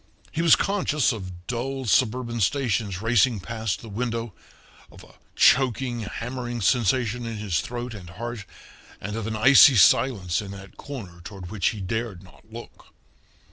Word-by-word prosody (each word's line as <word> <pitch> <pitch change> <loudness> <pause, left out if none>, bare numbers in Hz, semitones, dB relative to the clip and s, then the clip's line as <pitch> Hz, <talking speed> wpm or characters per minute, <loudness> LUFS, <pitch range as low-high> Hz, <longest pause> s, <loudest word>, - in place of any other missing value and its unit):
He 165 - -2
was 170 -2 +6
conscious 170 -9 +1
of 95 -6 -8
dull 130 +2 -4
suburban 120 +2 +1
stations 105 -4 -1
racing 115 0 +3
past 110 0 -4
the 115 - -11
window, 115 0 -4 0.6
of - - -15
a - - -18 0.2
choking, 125 -1 +3
hammering 120 +2 -5
sensation 120 +2 +1
in 115 -1 -5
his 105 -5 -1
throat 120 0 -6
and 95 -5 -10
heart, 115 +3 -7 0.5
and 105 +2 -5
of 115 -1 -4
an 110 - -3
icy 130 +4 +7
silence 95 -3 +3
in 100 - -8
that 100 0 -12
corner 100 -12 -9
toward 95 -1 -9
which 105 -4 0
he 105 - -2
dared 105 -1 -4
not 100 +4 -20
look. 115 +1 -12
115 Hz, 155 wpm, -24 LUFS, 100-125 Hz, 0.6 s, icy